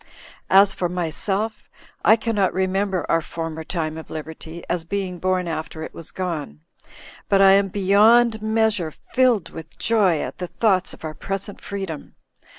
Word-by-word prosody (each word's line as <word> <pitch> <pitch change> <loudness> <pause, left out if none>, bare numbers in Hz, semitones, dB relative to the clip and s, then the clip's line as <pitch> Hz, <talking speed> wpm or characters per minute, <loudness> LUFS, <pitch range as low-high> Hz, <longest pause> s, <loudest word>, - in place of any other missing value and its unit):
As 195 +1 +6
for 175 -2 -2
myself, 190 +5 -2 0.3
I 220 - +7
cannot 220 -4 0
remember 190 0 0
our 165 - +2
former 160 0 -5
time 160 -2 -3
of 160 - -11
liberty, 160 +1 -8
as 175 - -1
being 185 0 -3
born 185 0 0
after 160 -1 -4
it - - -8
was 165 - -8
gone; 160 - -4 0.7
but 195 - +4
I 195 0 +7
am 195 0 +4
beyond 215 +4 +4
measure 220 -5 +1
filled 235 - +1
with 160 -1 -10
joy 200 -8 +2
at - - -6
the 180 - -3
thoughts 195 -1 +1
of - - -11
our 155 - -4
present 195 +4 -5
freedom. 195 -6 -6
185 Hz, 155 wpm, -22 LUFS, 165-205 Hz, 0.7 s, I